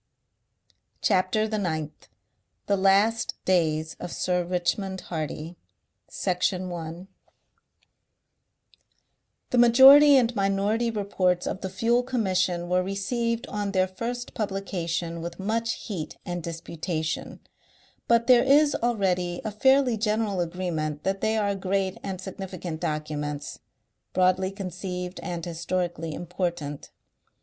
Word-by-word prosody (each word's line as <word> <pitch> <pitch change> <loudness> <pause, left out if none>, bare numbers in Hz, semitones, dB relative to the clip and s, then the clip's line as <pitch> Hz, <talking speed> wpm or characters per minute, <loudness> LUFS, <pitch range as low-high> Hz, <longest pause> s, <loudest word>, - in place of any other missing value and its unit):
CHAPTER 200 +2 +2
THE 215 -1 -2
NINTH 155 -5 -4 0.6
THE 200 - +2
LAST 200 +4 +3
DAYS 160 -4 +1
OF 175 - -6
SIR 180 -1 0
RICHMOND 185 +2 -1
HARDY 160 +1 -5 0.5
Section 185 0 -1
1 170 +1 -6 2.4
The 250 - +1
Majority 270 +4 +9
and 240 -2 +2
Minority 200 +4 +1
Reports 195 -4 0
of 190 - -3
the 190 - -3
Fuel 230 +6 +2
Commission 190 -8 0
were 180 +1 +2
received 230 +5 -2
on 205 -1 -3
their 185 -1 +3
first 235 +6 -5
publication 175 -5 -3
with 170 0 -6
much 225 +3 -1
heat 165 -8 -6
and 175 0 -3
disputation, 165 -1 -4 0.7
but 235 0 +4
there 245 -1 +6
is 290 +2 +5
already 185 -7 0
a 215 - -2
fairly 265 +2 +3
general 215 -2 0
agreement 165 -4 -3
that 195 0 -1
they 220 0 +1
are 205 -2 +1
great 190 0 -1
and 190 -2 -5
significant 185 -3 -6
documents, 150 -1 -3 0.5
broadly 185 +1 +3
conceived 185 -1 -5
and 170 -2 -4
historically 170 -1 -3
important. 175 -5 -4
185 Hz, 115 wpm, -26 LUFS, 175-215 Hz, 2.4 s, Majority